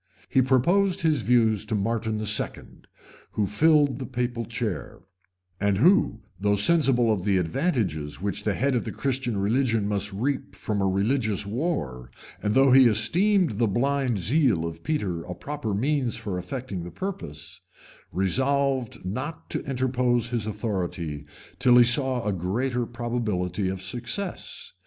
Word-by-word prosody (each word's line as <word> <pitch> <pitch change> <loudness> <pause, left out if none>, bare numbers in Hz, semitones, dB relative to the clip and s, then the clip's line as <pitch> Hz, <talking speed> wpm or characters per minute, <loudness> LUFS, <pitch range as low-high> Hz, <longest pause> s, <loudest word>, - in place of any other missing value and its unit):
[*] - - -27
He 130 - +4
proposed 175 +10 +2
his 155 -5 +2
views 110 -3 +3
to 110 0 -2
Martin 110 +1 -1
II., 105 -1 -3 0.5
who 105 - +1
filled 145 - +3
the 130 - -5
papal 120 -2 -2
chair, 110 -4 -4 0.6
and 100 -1 +1
who, 130 - +3 0.2
though 100 +1 +2
sensible 125 -1 +4
of 95 -4 -3
the 100 -1 +2
advantages 90 - -1
which 100 +2 -3
the 105 -2 0
head 135 +2 +1
of 120 - 0
the - - -5
Christian 130 -5 -2
religion 110 +1 +1
must 100 0 -1
reap 110 -1 -3
from 100 0 -2
a 95 - +2
religious 105 +1 0
war, 100 - -3 0.3
and 105 +2 0
though 135 0 +5
he 130 -1 +8
esteemed 160 - +2
the 115 - +3
blind 130 +2 0
zeal 110 - +2
of 80 0 -7
Peter 100 - -2
a 90 +1 -7
proper 145 0 -5
means 125 +4 0
for 105 -5 -4
effecting 100 +1 -5
the 85 - -7
purpose,[] 85 - -7 0.5
resolved 130 +5 0
not 130 - -5
to - - -2
interpose 125 -2 0
his 115 -3 -2
authority 90 -8 -3 0.3
till 125 -1 +5
he 120 - +9
saw 125 +1 +2
a 105 - 0
greater 120 +7 -1
probability 105 -6 -2
of 95 0 -4
success. 125 - -3
115 Hz, 150 wpm, -25 LUFS, 100-135 Hz, 0.6 s, he